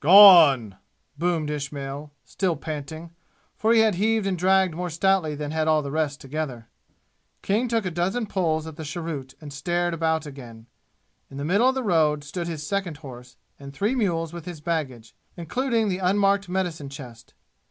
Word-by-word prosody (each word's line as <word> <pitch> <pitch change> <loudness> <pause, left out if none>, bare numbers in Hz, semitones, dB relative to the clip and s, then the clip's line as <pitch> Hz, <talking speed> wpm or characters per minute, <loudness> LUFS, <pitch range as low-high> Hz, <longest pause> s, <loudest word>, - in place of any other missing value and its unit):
"Gone!" 160 - +8 0.4
boomed 160 -1 -1
Ismail, 145 0 -5
still 185 -4 -1
panting, 155 +2 -7 0.4
for 220 - +1
he 230 -1 +6
had 220 -2 +3
heaved 215 +3 +1
and 195 -1 0
dragged 190 0 +3
more 180 +2 -4
stoutly 170 -2 +1
than 145 0 -5
had 160 0 -1
all 155 -1 +3
the 140 - -5
rest 150 -2 -1
together. 135 -5 -5 0.7
King 220 +6 +1
took 225 -3 0
a 180 - -2
dozen 185 +8 -1
pulls 165 -6 -1
at 160 -1 -9
the 160 - -6
cheroot 150 -4 -6
and 150 -2 -10
stared 175 +3 -1
about 160 -1 0
again. 120 -6 -11 0.6
In 135 - -10
the 140 - -4
middle 205 +10 +3
of 265 - -1
the 265 - -2
road 155 -7 +2
stood 170 +4 -5
his 155 -3 -5
second 185 -3 -2
horse, 125 -4 -12 0.2
and 140 -1 -9
three 205 - -1
mules 170 -9 -1
with 170 -2 -8
his 175 -3 -7
baggage, 145 -8 -4 0.2
including 225 - -1
the 185 -2 -1
unmarked 195 +1 +2
medicine 175 -6 -2
chest. 125 -5 -11
160 Hz, 175 wpm, -24 LUFS, 145-190 Hz, 0.7 s, Gone